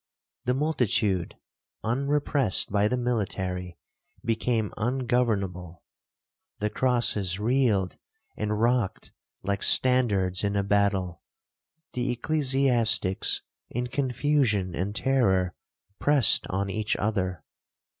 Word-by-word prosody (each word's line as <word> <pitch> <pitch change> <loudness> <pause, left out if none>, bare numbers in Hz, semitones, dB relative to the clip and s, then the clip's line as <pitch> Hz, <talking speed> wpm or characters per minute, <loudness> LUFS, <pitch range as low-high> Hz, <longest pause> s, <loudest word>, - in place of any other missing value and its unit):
The 125 +1 +1
multitude, 115 - 0 0.5
unrepressed 140 -2 +1
by 100 +1 +2
the 125 - -1
military, 95 -7 -3 0.5
became 115 -1 -1
ungovernable; 110 -8 -2 0.7
the 105 0 -2
crosses 105 -7 +2
reeled 110 -5 +1 0.4
and 105 0 -2
rocked 120 -3 0 0.3
like 100 +1 -2
standards 105 -8 +3
in 100 0 -1
a 100 - +1
battle; 100 -3 0 0.7
the 125 +1 -2
ecclesiastics, 125 -7 +2 0.3
in 125 +1 -3
confusion 125 - 0
and 100 +5 -3
terror, 95 -10 +1 0.5
pressed 145 -7 +4
on 100 +1 -2
each 110 +1 -1
other. 95 -6 -2
110 Hz, 95 wpm, -26 LUFS, 95-125 Hz, 0.7 s, pressed